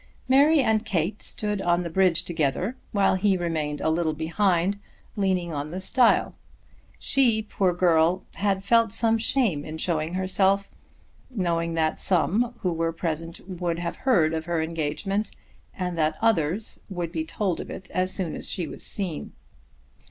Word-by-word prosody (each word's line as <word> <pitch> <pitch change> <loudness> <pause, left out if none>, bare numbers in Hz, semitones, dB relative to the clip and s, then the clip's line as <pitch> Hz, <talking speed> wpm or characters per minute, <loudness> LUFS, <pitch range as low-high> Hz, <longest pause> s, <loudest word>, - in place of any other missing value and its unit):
Mary 285 +4 +5
and 220 -3 +2
Kate 190 0 -1
stood 210 -2 -2
on 175 0 +1
the - - -3
bridge 185 -1 +3
together, 170 - -1 0.2
while 200 -3 +3
he 190 0 +2
remained 155 -4 -2
a - - +1
little 160 -1 0
behind 175 +4 +1 0.4
leaning 185 -4 0
on 145 0 -3
the 180 +4 -5
stile. 235 +5 +3 0.6
She, 235 -5 +2
poor 195 -3 0
girl, 175 0 +3
had 195 -1 0
felt 230 +1 +3
some 225 0 +3
shame 220 - +1
in 155 +1 -6
showing 160 0 -1
herself, 190 +1 +1 0.6
knowing 170 -7 -1
that 160 -1 0
some 210 +7 +1
who 180 -5 0
were 165 0 0
present 165 +1 -4
would 175 -3 -2
have 170 0 -4
heard 170 -12 +2
of 160 0 -3
her 170 -1 -1
engagement, 165 +6 -2 0.4
and 180 -2 -4
that 155 0 +1
others 210 -2 0
would 175 -3 -4
be 160 -2 -2
told 185 +1 -2
of - - -6
it 185 - -8
as 185 0 0
soon 175 -5 -2
as - - -1
she 175 -5 -2
was - - -8
seen. 185 -7 -4
180 Hz, 160 wpm, -25 LUFS, 165-205 Hz, 0.6 s, Mary